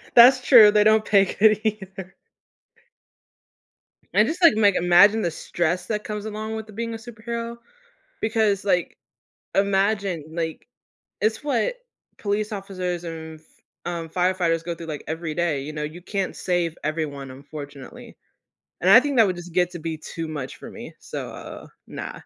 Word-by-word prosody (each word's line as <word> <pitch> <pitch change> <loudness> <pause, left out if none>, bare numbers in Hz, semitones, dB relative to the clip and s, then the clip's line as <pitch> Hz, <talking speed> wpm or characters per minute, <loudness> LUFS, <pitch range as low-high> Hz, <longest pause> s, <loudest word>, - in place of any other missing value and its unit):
That's 250 +2 +8
true. 220 -6 +9
They 210 0 +4
don't 215 0 +4
pay 195 -2 +5
good 215 +2 +3
either. 190 -3 -4 2.0
And - - +5
just 345 +3 -4
like 335 - +7
like, 205 -3 +4
imagine 200 +5 +5
the 170 - 0
stress 175 +2 -2
that 210 -1 -3
comes 210 -1 -5
along 220 +1 -5
with 220 0 -6
the 215 - -13
being 230 +2 -4
a - - -4
superhero 235 +1 -6 0.7
because 220 -3 +1
like 180 -3 0 0.6
imagine, 195 -4 +1
like, 160 -1 -4 0.5
it's 220 +5 0
what 275 - 0 0.4
police 210 +1 -2
officers 185 -3 -4
and 160 -1 -7
f, 155 - -29 0.4
um, 170 -2 -4
firefighters 180 -2 0
go 170 -1 -3
through 165 0 -9
like 150 -2 -6
every 160 -1 -4
day, 165 -5 0
you 150 +2 -6
know, 150 0 -5
you 160 +4 -6
can't 195 0 -3
save 175 -2 -1
everyone 150 -4 -3
unfortunately. 145 - -10 0.7
And - - +3
I - - +10
think 285 -3 -2
that 220 -3 +6
would 185 - -1
just 175 -1 -10
get 180 -1 +2
to 175 - -7
be 160 0 -4
too 165 +1 -6
much 145 -5 -6
for - - -10
me. - - -10
So, - - -6
uh, - - -10 0.2
no. - - -6
190 Hz, 165 wpm, -23 LUFS, 165-215 Hz, 2.0 s, I